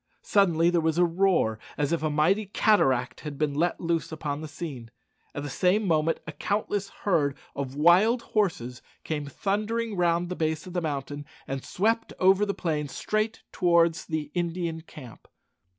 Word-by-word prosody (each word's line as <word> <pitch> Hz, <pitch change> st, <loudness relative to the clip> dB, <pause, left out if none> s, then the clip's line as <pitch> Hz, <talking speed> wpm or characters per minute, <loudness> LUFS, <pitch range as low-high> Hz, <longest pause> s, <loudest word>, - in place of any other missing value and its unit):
Suddenly 175 Hz, -4 st, +3 dB
there 175 Hz, -1 st, +2 dB
was 160 Hz, 0 st, 0 dB
a 175 Hz, -, +5 dB
roar 170 Hz, -, +2 dB, 0.2 s
as 145 Hz, 0 st, 0 dB
if 170 Hz, -, 0 dB
a 155 Hz, -, 0 dB
mighty 175 Hz, +8 st, +2 dB
cataract 135 Hz, -, +2 dB
had 150 Hz, -2 st, -7 dB
been 150 Hz, -1 st, 0 dB
let 170 Hz, +4 st, 0 dB
loose 165 Hz, -2 st, -1 dB
upon 150 Hz, -2 st, -4 dB
the 155 Hz, -, -5 dB
scene. 145 Hz, -6 st, -7 dB, 0.5 s
At 145 Hz, -, -4 dB
the -, -, -4 dB
same 190 Hz, +7 st, +2 dB
moment 160 Hz, -2 st, +1 dB
a 165 Hz, -, -5 dB
countless 200 Hz, +5 st, -2 dB, 0.2 s
herd 145 Hz, -8 st, +2 dB, 0.2 s
of 135 Hz, -1 st, -4 dB
wild 185 Hz, -, +4 dB
horses 130 Hz, -, 0 dB, 0.2 s
came 150 Hz, -2 st, -3 dB
thundering 215 Hz, -, -2 dB
round 175 Hz, -1 st, +1 dB
the 180 Hz, -, -3 dB
base 160 Hz, -2 st, -1 dB
of 180 Hz, -, -9 dB
the 180 Hz, -, 0 dB
mountain 145 Hz, -2 st, -4 dB, 0.2 s
and 135 Hz, -1 st, -4 dB
swept 225 Hz, +4 st, 0 dB
over 190 Hz, +2 st, +4 dB
the 200 Hz, -, -1 dB
plain 150 Hz, -4 st, -1 dB
straight 215 Hz, +9 st, -2 dB
towards 170 Hz, -2 st, +2 dB
the 155 Hz, -2 st, -3 dB
Indian 170 Hz, -2 st, -2 dB
camp. 130 Hz, -7 st, -13 dB
165 Hz, 170 wpm, -27 LUFS, 150-190 Hz, 0.5 s, a